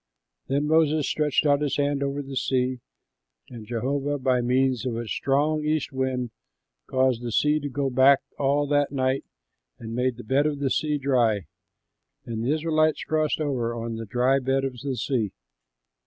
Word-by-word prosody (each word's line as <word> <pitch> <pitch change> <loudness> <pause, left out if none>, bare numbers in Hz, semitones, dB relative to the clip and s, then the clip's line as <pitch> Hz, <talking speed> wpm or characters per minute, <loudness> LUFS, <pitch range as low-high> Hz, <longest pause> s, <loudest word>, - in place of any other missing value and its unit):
Then 140 +2 0
Moses 155 -1 +3
stretched 150 0 +1
out 145 0 +3
his 145 -2 0
hand 145 -1 0
over 140 +1 -2
the 135 0 -8
sea, 130 -1 0 0.7
and 115 -3 -9
Jehovah 140 +5 -1
by 130 -2 +1
means 130 0 +1
of 125 -3 -2
a 115 -1 -4
strong 150 +6 0
east 155 0 -1
wind 130 -2 -2 0.6
caused 130 -2 +1
the 120 -1 -4
sea 150 +6 +2
to 145 -1 -4
go 140 0 -1
back 130 +2 +5 0.2
all 145 +1 +2
that 145 0 +1
night 130 -1 0 0.5
and 115 0 -7
made 125 0 0
the 120 - -8
bed 135 +6 +2
of 150 -1 -2
the 140 -2 -1
sea 150 +3 0
dry. 120 - +1 0.8
And 115 -1 -4
the 125 - +1
Israelites 155 0 +1
crossed 155 -1 0
over 125 -6 -1
on 115 -1 -4
the 115 -1 -6
dry 125 +5 +2
bed 135 +1 0
of 130 -2 -5
the 140 -2 -2
sea. 115 -8 -1
135 Hz, 175 wpm, -25 LUFS, 125-145 Hz, 0.8 s, back